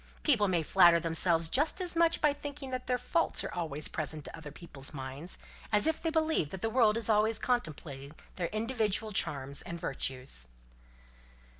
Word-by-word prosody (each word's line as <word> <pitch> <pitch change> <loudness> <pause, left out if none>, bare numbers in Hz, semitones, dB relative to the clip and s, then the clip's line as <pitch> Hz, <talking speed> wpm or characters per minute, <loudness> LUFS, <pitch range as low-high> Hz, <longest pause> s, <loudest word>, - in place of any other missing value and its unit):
People 230 -9 +4
may 175 -3 +1
flatter 175 0 +5
themselves 165 0 +3
just 290 - +3
as 360 -2 0
much 330 0 +3
by 300 -2 +3
thinking 285 -2 -8
that 255 0 -4
their 250 -1 +1
faults 330 +7 0
are - - -5
always 155 -4 -3
present 155 -1 -5
to - - -7
other 160 -2 -9
people's 145 -3 -6
minds, 135 +6 -4 0.3
as 210 -1 +5
if 320 -1 +1
they 330 - 0
believe 320 - +1
that 190 +2 -8
the 225 - 0
world 225 -3 +3
is 230 - -2
always 215 0 +3
contemplating 150 - -3 0.2
their 175 -2 -2
individual 220 -1 -1
charms 140 -7 0
and 170 0 -7
virtues." 130 - -3
190 Hz, 175 wpm, -31 LUFS, 155-250 Hz, 0.3 s, flatter